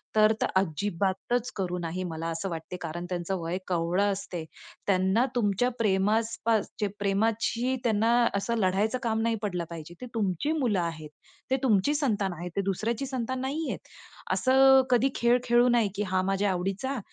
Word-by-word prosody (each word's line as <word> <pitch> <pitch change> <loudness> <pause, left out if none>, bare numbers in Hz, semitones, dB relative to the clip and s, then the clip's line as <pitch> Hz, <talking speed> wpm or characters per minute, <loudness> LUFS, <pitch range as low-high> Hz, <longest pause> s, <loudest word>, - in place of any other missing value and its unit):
तर, 215 0 +6
तर - - +3
अजिबातच 195 - 0
करू 180 -2 -2
नाही, 175 +2 -3
मला 165 -2 -4
असं 165 +3 -3
वाटते. 165 +2 -6
कारण 170 +1 -5
त्यांचं 180 +1 -2
वय 165 +2 -2
कवळं 180 +3 +1
असते. 190 -4 -5 0.4
त्यांना 190 +5 +3
तुमच्या 225 +1 +2
प्रेमास 215 +2 +1
पास 225 -2 +2
चे 210 - +1
प्रेमाची 225 +5 +1
त्यांना 225 -1 +2 0.3
असं 215 +4 0
लढायचं 205 +4 +1
काम 225 -1 0
नाही 230 0 +1
पडलं 180 -5 -2
पाहिजे. 165 0 -8
ते - - -5
तुमची 205 - 0
मुलं 225 -8 +1
आहेत, 165 -3 -4 0.4
ते 265 - +4
तुमची 230 +2 +3
संतान 210 -10 0
आहे, 180 +1 -5
ते 200 - +1
दुसऱ्याची 215 +6 -1
संतान 260 -1 -3
नाहीयेत. 290 +5 -2 0.5
असं 265 0 +6
कधी 250 +2 +4
खेळ 235 +1 +4
खेळू 240 0 +4
नाही, 235 -4 +3
की 210 - -1
"हा 185 - +2
माझ्या 195 +1 +1
आवडीचा 195 +9 -2
205 Hz, 165 wpm, -28 LUFS, 185-235 Hz, 0.5 s, तर